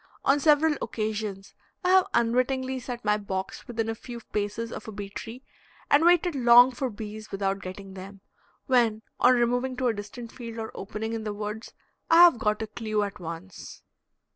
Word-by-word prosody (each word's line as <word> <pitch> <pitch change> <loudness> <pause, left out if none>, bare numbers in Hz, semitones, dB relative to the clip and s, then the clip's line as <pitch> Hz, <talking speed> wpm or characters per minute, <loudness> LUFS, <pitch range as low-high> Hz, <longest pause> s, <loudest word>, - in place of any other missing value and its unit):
On 275 +2 +4
several 300 0 +4
occasions 215 -3 -4 0.3
I 360 - +1
have 375 0 +5
unwittingly 255 +3 +1
set 245 -2 -7
my 210 0 +3
box 190 +1 -5
within 225 -2 -2
a 225 - -1
few 235 +1 -9
paces 210 +2 -2
of - - -8
a - - -5
bee 200 -1 -7
tree 235 +5 -8 0.5
and 290 +2 +6
waited 350 0 +4
long 245 -1 +7
for 260 +1 -3
bees 215 0 -8
without 195 0 -1
getting 190 +1 -8
them, 195 +1 -10 0.4
when, 230 -5 +2 0.2
on 250 +1 +6
removing 245 +2 0
to 255 -1 +1
a - - +1
distant 220 +3 -8
field 230 -2 -8
or 220 -1 -5
opening 215 +3 -5
in 225 -1 -3
the 210 -1 -4
woods 210 +2 -6 0.4
I 330 +1 +8
have 340 -9 +6
got 210 0 0
a - - -2
clew 215 -1 -2
at 205 0 -5
once. 170 +1 -9
225 Hz, 185 wpm, -27 LUFS, 205-250 Hz, 0.5 s, I